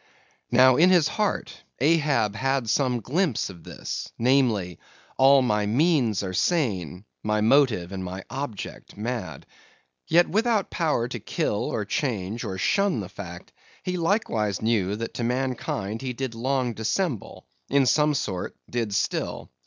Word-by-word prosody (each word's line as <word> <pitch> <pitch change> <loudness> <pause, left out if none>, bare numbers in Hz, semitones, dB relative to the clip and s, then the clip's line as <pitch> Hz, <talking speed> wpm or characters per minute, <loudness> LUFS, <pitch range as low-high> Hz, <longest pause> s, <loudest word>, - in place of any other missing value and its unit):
Now, 130 +1 +6
in 175 +4 +6
his 175 -5 +5
heart, 210 +5 -2 0.2
Ahab 145 -7 +2
had 135 0 0
some 125 +1 +1
glimpse 145 - 0
of 85 -3 -14
this, - - -6
namely: 115 - +2 0.4
all 135 0 +6
my 105 -4 +1
means 125 - +2
are 95 -1 -4
sane, 95 - 0 0.2
my 105 0 0
motive 110 -7 +3
and 95 -1 -4
my 95 +1 -6
object 130 -9 -6
mad. 115 -2 -4 0.6
Yet 175 +2 +5
without 220 +1 +1
power 150 -9 0
to 120 -1 -5
kill, 105 0 -1
or 105 - -2
change, 110 - -2
or 95 -4 -4
shun 195 - +1
the 95 -3 -6
fact; 90 -3 -9 0.3
he 180 - -2
likewise 165 - 0
knew 105 -4 +1
that 115 +1 -5
to 120 - -3
mankind 120 -4 -2
he 130 -1 -3
did 130 -1 -4
long 125 +1 -1
dissemble; 120 - -2 0.2
in 140 -1 +4
some 150 +4 +3
sort, 90 -8 -3 0.2
did 115 -4 -1
still. - - -2
120 Hz, 145 wpm, -25 LUFS, 105-145 Hz, 0.6 s, Now